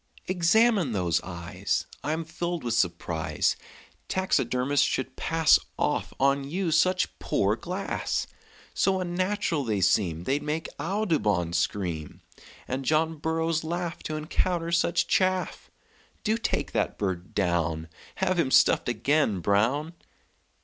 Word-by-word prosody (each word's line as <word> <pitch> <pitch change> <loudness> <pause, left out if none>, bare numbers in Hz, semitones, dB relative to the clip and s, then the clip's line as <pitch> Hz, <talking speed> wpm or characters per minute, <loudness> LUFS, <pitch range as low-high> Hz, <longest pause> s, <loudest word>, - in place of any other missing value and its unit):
"Examine 185 - +3
those 90 -5 +1
eyes. 85 -2 -3 0.2
I'm 160 +4 -2
filled 175 +1 -3
with 120 -2 -1
surprise 85 -6 0 0.5
Taxidermists 140 -7 +1
should 130 0 -2
pass 160 -1 +4 0.2
Off - - 0
on 140 +1 +3
you 170 +5 -2
such 185 +4 +2
poor - - +1
glass; - - -3 0.5
So 190 -1 +2
unnatural 185 -3 -1
they 110 -5 -1
seem 85 -4 +2
They'd 140 +8 0
make 150 +2 -2
Audubon 145 - 0
scream, 85 -3 -2 0.5
And 130 +1 -3
John 160 +3 +1
Burroughs 160 +1 -1
laugh 170 +1 -3
To 155 - -3
encounter 165 +2 -1
such 170 0 +2
chaff. 185 -1 0 0.5
Do 215 0 +2
take 230 - -2
that - - -1
bird 95 -3 -3
down; 85 -4 0 0.3
Have 185 -2 0
him 150 -6 +2
stuffed 130 - +4
again, 120 -3 +1
Brown!" 115 - +1
150 Hz, 120 wpm, -27 LUFS, -, 0.5 s, pass